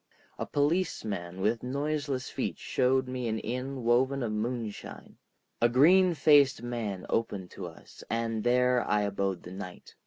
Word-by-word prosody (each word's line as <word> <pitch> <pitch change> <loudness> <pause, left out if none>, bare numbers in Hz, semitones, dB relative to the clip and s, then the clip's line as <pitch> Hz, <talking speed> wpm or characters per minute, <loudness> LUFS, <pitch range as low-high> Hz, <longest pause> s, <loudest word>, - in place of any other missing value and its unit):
A - - -3
policeman 110 - -1
with 110 +3 +1
noiseless 140 0 -2
feet - - -3
showed 130 0 +1
me 125 -1 -3
an 110 0 -1
inn 125 +3 -4
woven 130 +3 +2
of 115 - -2
moonshine, 110 0 -5 0.4
a 120 - +5
green 175 +8 +5
faced 140 -3 +5
man 115 -6 -4
opened 100 -5 -2
to 90 - -7
us, 80 - -13
and 115 -1 -1
there 125 0 +3
I 105 0 +2
abode 100 -2 -2
the 90 - -9
night. 95 -1 -9
120 Hz, 150 wpm, -29 LUFS, 105-135 Hz, 0.4 s, a